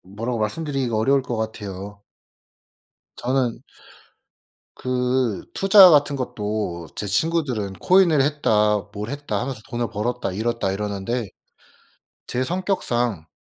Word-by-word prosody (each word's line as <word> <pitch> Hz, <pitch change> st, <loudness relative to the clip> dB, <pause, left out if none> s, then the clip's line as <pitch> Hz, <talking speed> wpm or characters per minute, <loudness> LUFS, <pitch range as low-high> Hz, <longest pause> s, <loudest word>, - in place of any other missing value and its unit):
뭐라고 115 Hz, +5 st, -4 dB
말씀드리기가 130 Hz, +1 st, -2 dB
어려울 135 Hz, +5 st, +3 dB
것 125 Hz, -2 st, -4 dB
같아요. 100 Hz, -2 st, -6 dB, 1.1 s
저는 125 Hz, -1 st, -1 dB, 1.2 s
그 125 Hz, -3 st, -1 dB
투자 195 Hz, -1 st, +8 dB
같은 145 Hz, -2 st, +4 dB
것도 105 Hz, -9 st, -3 dB
제 105 Hz, -, -3 dB
친구들은 115 Hz, -, 0 dB
"코인을 170 Hz, -, +4 dB
했다. 110 Hz, -8 st, +2 dB
뭘 105 Hz, +2 st, -5 dB
했다." 145 Hz, +1 st, -3 dB
하면서 125 Hz, -2 st, -4 dB
"돈을 120 Hz, -1 st, -2 dB
벌었다. 115 Hz, -1 st, -2 dB
잃었다." 110 Hz, 0 st, -1 dB
이러는데 105 Hz, +3 st, -3 dB, 1.0 s
제 125 Hz, -, -2 dB
성격상 125 Hz, -, -1 dB
120 Hz, 255 characters per minute, -22 LUFS, 105-135 Hz, 1.2 s, 투자